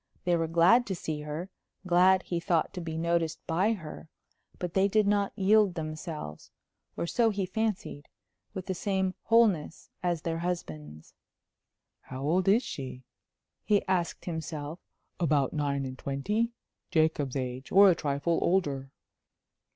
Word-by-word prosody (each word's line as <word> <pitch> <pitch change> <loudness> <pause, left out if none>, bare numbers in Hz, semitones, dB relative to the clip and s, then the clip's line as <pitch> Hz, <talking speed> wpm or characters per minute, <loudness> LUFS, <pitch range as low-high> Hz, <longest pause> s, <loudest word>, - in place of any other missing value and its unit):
They 175 -1 +2
were 165 -1 0
glad 175 +10 +5
to 190 - -2
see 155 -3 -4
her; 150 +5 -5 0.3
glad, 185 +1 +5
he 175 - -2
thought, 170 -1 0
to 180 - -5
be 160 -1 -4
noticed 170 -1 0
by 185 +7 +2
her. 160 -4 -9 0.5
But 175 -1 -4
they 195 0 +4
did 215 +1 +3
not 200 -1 +2
yield 205 -1 +4
themselves 155 - -6 0.5
or - - -1
so 230 +6 +2
he 200 -3 -1
fancied 190 -7 -3 0.5
with 185 -1 -5
the 190 - -2
same 190 0 -1
wholeness 215 -9 +2
as 175 -2 -1
their 165 -1 -2
husbands. 80 - -5 0.9
"How 130 +1 -7
old 175 +6 +1
is 215 +6 +5
she?" 130 - -7 0.6
he 205 -1 +2
asked 180 -3 -1
himself. 160 -1 -5 0.4
"About 150 -6 +2
nine 140 -2 -1
and 130 -1 -7
twenty?... 210 - -1 0.4
Jacob's 155 -6 +1
age 130 0 -4
or 195 0 +8
a - - +4
trifle 155 +1 0
older." 145 -7 0
170 Hz, 145 wpm, -29 LUFS, 150-190 Hz, 0.9 s, or